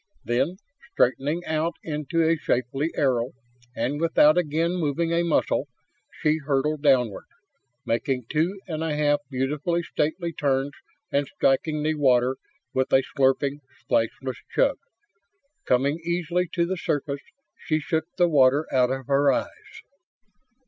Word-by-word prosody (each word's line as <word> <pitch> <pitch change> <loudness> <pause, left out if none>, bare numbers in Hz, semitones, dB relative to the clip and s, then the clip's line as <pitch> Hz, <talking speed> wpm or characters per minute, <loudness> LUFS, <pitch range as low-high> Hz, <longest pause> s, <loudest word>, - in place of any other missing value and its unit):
Then, 135 +10 0 0.4
straightening 145 +7 +1
out 160 +2 -1
into 155 +2 -1
a 165 +1 +3
shapely 135 +1 -1
arrow 125 -3 +1 0.4
and 145 +4 -2
without 155 -2 +5
again 165 0 +1
moving 165 +1 0
a 170 - +2
muscle, 155 -3 +1 0.4
she 155 -1 0
hurtled 145 +1 0
downward, 125 -8 +2 0.6
making 125 +2 -1
two 165 +8 0
and 160 -2 -3
a 160 -2 -1
half 145 -1 +2
beautifully 145 +6 -1
stately 165 +2 -2
turns 140 -1 0 0.4
and 140 0 +1
striking 150 +4 +1
the 155 +1 +1
water 130 -3 +3 0.4
with 130 0 0
a 135 - +5
slurping, 140 +1 +2 0.2
splashless 125 +2 -1
chug! - - +1 0.9
Coming 140 +5 +2
easily 175 +1 -1
to 170 -1 +2
the 185 +2 -2
surface, 145 -3 -2 0.3
she 155 -2 -1
shook 160 +1 -1
the 175 -1 +4
water 145 -1 +4
out 125 -2 +4
of 135 0 -3
her 140 +1 +3
eyes. 430 - -5
150 Hz, 135 wpm, -25 LUFS, 135-165 Hz, 0.9 s, without